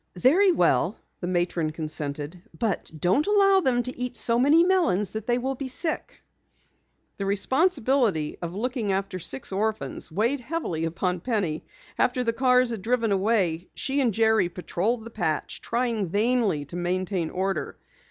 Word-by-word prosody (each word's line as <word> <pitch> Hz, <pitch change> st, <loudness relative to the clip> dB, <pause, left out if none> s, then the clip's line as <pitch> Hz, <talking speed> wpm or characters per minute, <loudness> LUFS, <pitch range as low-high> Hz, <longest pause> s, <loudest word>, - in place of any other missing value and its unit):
"Very 360 Hz, -, +5 dB
well," -, -, +2 dB, 0.2 s
the 175 Hz, -, -4 dB
matron 175 Hz, -3 st, 0 dB
consented. 155 Hz, +1 st, -4 dB, 0.2 s
"But 220 Hz, -5 st, -1 dB
don't 185 Hz, -, +2 dB
allow 395 Hz, -2 st, +5 dB
them 250 Hz, -8 st, +1 dB
to 250 Hz, +1 st, -4 dB
eat 250 Hz, 0 st, -4 dB
so 235 Hz, 0 st, +2 dB
many 295 Hz, +6 st, +5 dB
melons 335 Hz, -, +2 dB
that 220 Hz, 0 st, -6 dB
they 240 Hz, 0 st, +2 dB
will 260 Hz, +2 st, -1 dB
be 270 Hz, +1 st, -5 dB
sick." 315 Hz, +5 st, -3 dB, 0.9 s
The 195 Hz, -, -3 dB
responsibility 250 Hz, -, +1 dB
of 170 Hz, +1 st, -5 dB
looking 235 Hz, -1 st, -1 dB
after 190 Hz, -1 st, -2 dB
six 135 Hz, -2 st, -3 dB
orphans 195 Hz, -11 st, -2 dB
weighed 230 Hz, -, +1 dB
heavily 245 Hz, -, -3 dB
upon 180 Hz, +2 st, -1 dB
Penny. 185 Hz, -7 st, -2 dB, 0.3 s
After 250 Hz, 0 st, +2 dB
the 230 Hz, -1 st, 0 dB
cars 250 Hz, 0 st, +3 dB
had 225 Hz, -4 st, -4 dB
driven 230 Hz, +1 st, 0 dB
away, 190 Hz, -4 st, +1 dB
she 275 Hz, +1 st, 0 dB
and 245 Hz, -4 st, +2 dB
Jerry 220 Hz, -3 st, +3 dB
patrolled 205 Hz, +6 st, -2 dB
the 230 Hz, -, -9 dB
patch, 165 Hz, -8 st, -2 dB
trying 235 Hz, -5 st, -1 dB
vainly 210 Hz, -6 st, +1 dB
to 145 Hz, -, -8 dB
maintain 180 Hz, -1 st, -1 dB
order. 190 Hz, -2 st, -2 dB
220 Hz, 155 wpm, -25 LUFS, 180-250 Hz, 0.9 s, Very